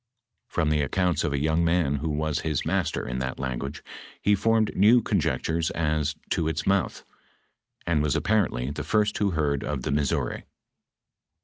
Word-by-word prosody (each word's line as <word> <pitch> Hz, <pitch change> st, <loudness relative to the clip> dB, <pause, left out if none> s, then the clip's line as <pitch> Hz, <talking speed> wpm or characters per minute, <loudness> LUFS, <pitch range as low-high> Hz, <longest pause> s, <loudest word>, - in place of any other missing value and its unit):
From 80 Hz, -3 st, 0 dB
the 75 Hz, -1 st, +2 dB
accounts 85 Hz, +2 st, 0 dB
of -, -, 0 dB
a 70 Hz, -, 0 dB
young 80 Hz, +4 st, +1 dB
man 80 Hz, -4 st, +2 dB
who 80 Hz, +3 st, -3 dB
was 75 Hz, 0 st, -1 dB
his 75 Hz, -4 st, -2 dB
master 90 Hz, +2 st, -1 dB
in 65 Hz, +1 st, -3 dB
that 65 Hz, 0 st, -3 dB
language, 70 Hz, +2 st, -4 dB, 0.4 s
he 105 Hz, -, +2 dB
formed 110 Hz, +2 st, +2 dB
new 110 Hz, +6 st, +6 dB
conjectures 80 Hz, +1 st, 0 dB
as 75 Hz, -1 st, -1 dB, 0.2 s
to 80 Hz, -4 st, +1 dB
its 80 Hz, +1 st, -2 dB
mouth, 95 Hz, -3 st, 0 dB, 0.8 s
and 85 Hz, -3 st, +1 dB
was 75 Hz, -2 st, +1 dB
apparently 90 Hz, -, +1 dB
the 75 Hz, -, -4 dB
firet 105 Hz, +5 st, +1 dB
who 105 Hz, -1 st, +2 dB
heard 75 Hz, -5 st, 0 dB
of 70 Hz, -4 st, -3 dB
the -, -, -2 dB
Missouri. 70 Hz, -1 st, -1 dB
80 Hz, 170 wpm, -26 LUFS, 70-90 Hz, 0.8 s, new